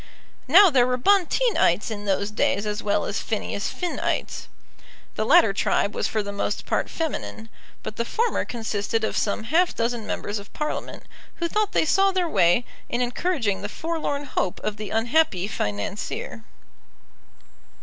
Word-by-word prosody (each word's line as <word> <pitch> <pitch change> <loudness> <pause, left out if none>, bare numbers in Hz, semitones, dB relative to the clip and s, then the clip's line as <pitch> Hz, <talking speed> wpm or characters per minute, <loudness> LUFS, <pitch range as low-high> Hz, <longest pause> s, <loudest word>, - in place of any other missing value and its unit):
Now 365 +6 +8
there 250 -3 +4
were 250 0 0
Bonteenites 375 - +2
in 205 -1 -5
those 200 +1 0
days 210 -1 +1
as 210 0 -2
well 205 - 0
as - - -2
Phineas - - -3
Finnites. 355 -2 -3 0.7
The 215 - -1
latter 220 -3 +6
tribe 200 0 +1
was - - -1
for 215 -1 -1
the 200 - -5
most 200 - -3
part - - -1
feminine; 275 -8 -4 0.3
but 215 - -6
the 235 - +1
former 460 - 0
consisted 225 -1 -2
of 220 - -1
some 205 +1 0
half 340 +9 +2
dozen 230 -1 -2
members 205 +1 -3
of 200 - -13
Parliament, 300 0 -4 0.3
who 340 - -1
thought 425 +3 0
they - - +3
saw 390 +5 +4
their 370 -2 0
way 175 - +3 0.2
in 240 - -1
encouraging 245 - 0
the 205 - -4
forlorn 315 0 -3
hope 190 -8 -2
of 215 0 -3
the 210 -1 -6
unhappy 225 - +1
financier. 195 - -4
230 Hz, 160 wpm, -24 LUFS, 205-320 Hz, 0.7 s, Now